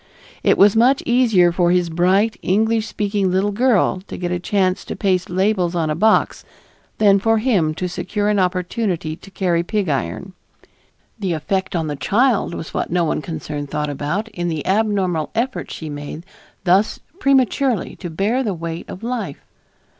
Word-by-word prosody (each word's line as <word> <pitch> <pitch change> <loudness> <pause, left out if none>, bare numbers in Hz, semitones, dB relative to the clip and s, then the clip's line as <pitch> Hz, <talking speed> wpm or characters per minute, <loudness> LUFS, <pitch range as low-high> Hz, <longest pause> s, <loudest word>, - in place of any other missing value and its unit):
It - - +3
was 200 +1 +6
much 250 +5 +4
easier 225 -8 +4
for 175 0 +2
his 175 -1 +1
bright, 190 +6 +2
English 220 +3 +1
speaking 205 -2 -1
little 190 +3 +1
girl 210 -4 +2
to - - -7
get 175 -1 -3
a 180 - -1
chance 185 0 0
to - - -5
paste 185 -3 0
labels 185 -1 +1
on 160 -3 0
a - - -1
box 215 +6 +2 0.5
than 200 -2 +5
for 225 +2 +2
him 200 -10 +1
to 180 - -2
secure 205 +3 -2
an 210 -1 +2
opportunity 180 -2 -1
to - - -14
carry 180 -3 0
pig 195 0 -2
iron. 140 - -3 0.9
The 190 -4 -1
effect 190 +4 -2
on 165 -2 0
the 150 -1 -3
child 205 - +1
was 160 - -7
what - - -2
no 175 0 +1
one 155 - -1
concerned 150 -3 -5
thought 150 0 -2
about, 150 +10 -2
in 175 -4 -4
the 160 -3 -3
abnormal 190 -6 0
effort 250 +3 -2
she 160 - -7
made 145 +3 -7 0.4
thus 190 +4 +2 0.2
prematurely 265 - +1
to 175 - -6
bear 205 +10 0
the 210 -7 -2
weight 165 0 -6
of 185 - -8
life. 230 - -4
185 Hz, 175 wpm, -20 LUFS, 170-215 Hz, 0.9 s, was